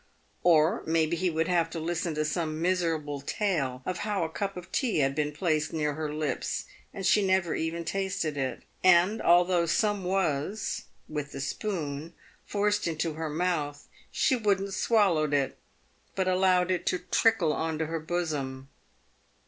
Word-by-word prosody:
Or 165 +4 +4
maybe 160 0 +2
he 180 +2 0
would 160 0 0
have 170 -2 +2
to 165 - -5
listen 170 0 -2
to 155 0 0
some 155 -1 -2
miserable 165 -5 0
tale 140 - -1
of 180 -1 -2
how 205 -4 -1
a 160 - -2
cup 195 +3 -4
of 180 0 -9
tea 250 - 0
had 135 -2 +2
been 150 +1 -1
placed 155 -1 0
near 150 -2 0
her 155 0 -3
lips, 150 -3 -2 0.3
and 195 - -6
she 205 +2 +4
never 185 -3 +2
even 165 +1 -2
tasted 185 -4 -2
it, 135 -2 -3 0.2
and 185 +4 +5
although 175 0 +4
some 205 +3 +1
was, 180 0 -1 0.2
with 150 -2 -5
the 140 - -5
spoon, 160 -2 -4 0.3
forced 210 -1 +1
into 165 0 -1
her 160 0 -4
mouth, 150 -3 -2 0.2
she 260 - +2
wouldn't 200 -4 0
swallow 185 -10 +2
it, 140 -2 0 0.6
but 190 -1 0
allowed 185 -1 +3
it 180 - -1
to 180 - +2
trickle 180 -2 +2
on 160 -1 -2
to 160 - -1
her 165 +1 -3
bosom. 150 -5 -3
170 Hz, 165 wpm, -28 LUFS, 155-185 Hz, 0.6 s, and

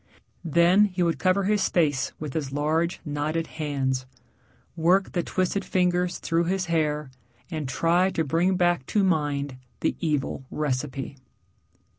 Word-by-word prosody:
Then 170 +5 +5
he 185 -3 -1
would 170 -1 0
cover 185 +1 +2
his 205 +1 +2
face 145 -6 +1
with 150 -3 -5
his 145 -4 -3
large, 155 +4 0
knotted 150 +2 -1
hands, 135 -5 -2 0.7
work 180 +4 +3
the 175 - 0
twisted 185 +3 -1
fingers 180 -1 +1
through 165 0 0
his 190 +1 0
hair, 150 -4 0 0.4
and 155 -5 -3
try 170 +7 +2
to 165 - -1
bring 170 +6 +1
back 175 -6 +1
to 210 - +2
mind 145 -6 0 0.2
the - - +1
evil 150 -5 -1
recipe. 140 -1 -3
165 Hz, 140 wpm, -26 LUFS, 145-180 Hz, 0.7 s, Then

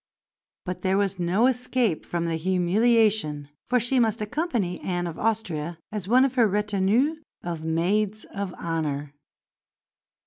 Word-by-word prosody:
But 180 -1 -4
there 190 0 +1
was 195 -2 0
no 180 +7 +2
escape 250 -7 0
from 170 -1 -2
the 165 -1 -1
humiliation, 185 -3 +2 0.2
for 250 0 +3
she 245 +3 +1
must 225 -2 +2
accompany 215 - -2
Anne 175 -1 -2
of 170 -2 -6
Austria, 175 -8 -1
as 210 -4 -5
one 255 +4 +5
of 270 - -1
her 240 -4 +4
retinue 210 +8 +1 0.3
of 170 -2 -4
maids 195 +6 0
of 200 -2 -3
honour. 150 -4 -3
195 Hz, 140 wpm, -25 LUFS, 170-225 Hz, 0.3 s, one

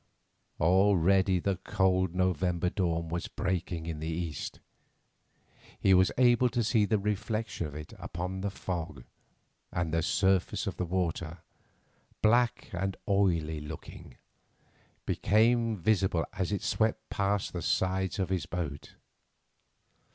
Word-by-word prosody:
Already 95 +1 +4
the 95 +1 -1
cold 95 -1 +1
November 90 -1 +1
dawn 85 -3 -1
was 85 +3 -3
breaking 90 -4 -3
in 80 -2 -4
the 80 - -4
east; 80 -2 -4 1.2
he 95 - +4
was 95 +1 +5
able 125 0 +5
to 120 -1 0
see 110 -1 +3
the 110 +1 +2
reflection 105 -2 -2
of 75 - -10
it 75 0 -8
upon 90 +3 -4
the 100 - -1
fog, 90 -9 -5 0.7
and 85 -2 -2
the 80 - +2
surface 95 +2 +1
of - - -4
the 90 - -1
water, 85 -2 -2 0.8
black 120 +2 +3
and 95 +1 -2
oily 85 -6 +1
looking, 75 -4 -9 0.9
became 115 +1 +2
visible 95 -3 +1
as 95 -2 -2
it 100 - -2
swept 110 0 0
past 100 0 0
the 90 - -3
sides 95 +2 0
of 95 -2 -1
his 95 -2 -1
boat. 80 -5 -5
95 Hz, 130 wpm, -30 LUFS, 85-100 Hz, 1.2 s, was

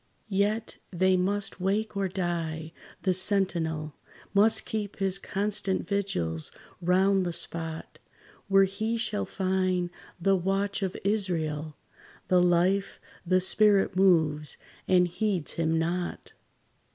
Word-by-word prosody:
Yet 210 +3 0
they 185 +1 +2
must 195 +3 -1
wake 210 +3 0
or 200 -1 0
die; 170 -3 -3 0.3
the 185 - +2
sentinel 170 -5 0 0.4
Must 210 +2 +4
keep 210 -2 -4
his 195 -1 +1
constant 195 -2 -1
vigils 90 - -1 0.3
round 190 +2 +3
the 175 - -2
spot 165 -1 -5 0.5
Where 195 0 +5
he 220 +4 -1
shall 215 -2 -1
find 185 -2 0 0.3
the 195 +3 +3
watch 195 +2 -1
of 190 -1 -2
Israel: 160 -7 -1 0.5
The 180 -1 +5
life, 180 +3 +2 0.3
the 185 +1 +4
spirit 195 0 +3
moves, 160 -6 +3 0.3
and 180 -1 +4
heeds 180 -2 -1
him 165 -1 0
not. 175 +2 -2
185 Hz, 115 wpm, -28 LUFS, 170-200 Hz, 0.5 s, Where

